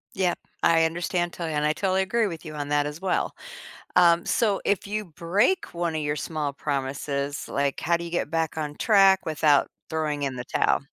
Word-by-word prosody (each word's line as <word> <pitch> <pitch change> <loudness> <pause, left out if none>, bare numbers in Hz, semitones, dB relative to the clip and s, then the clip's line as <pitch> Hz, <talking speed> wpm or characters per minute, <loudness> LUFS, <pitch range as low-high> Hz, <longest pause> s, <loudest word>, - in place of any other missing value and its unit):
Yep. 185 -2 0 0.2
I 165 -1 +5
understand 175 +1 -1
totally 165 -3 -4
and 150 0 +1
I 150 - +2
totally 190 +1 +1
agree 220 +3 +1
with 165 -2 -7
you 155 - -7
on 145 -1 -4
that 145 0 +2
as 150 +4 -6
well. 190 -2 -1 0.6
Um, 170 -1 +5
so 210 -4 +1
if 200 -1 0
you 210 +1 -2
break 190 - 0
one 170 -2 -2
of 155 - -1
your 145 0 -1
small 150 -2 -3
promises, 140 +1 -3
like, 140 -1 -1
how 170 +1 +2
do 170 - -6
you 170 - -7
get 175 - -1
back 160 -1 -1
on 150 -1 -3
track 195 -3 +4
without 150 -2 +3 0.2
throwing 150 -2 -2
in 135 -2 -2
the 125 0 -6
towel? - - +2
165 Hz, 205 wpm, -25 LUFS, 150-180 Hz, 0.6 s, I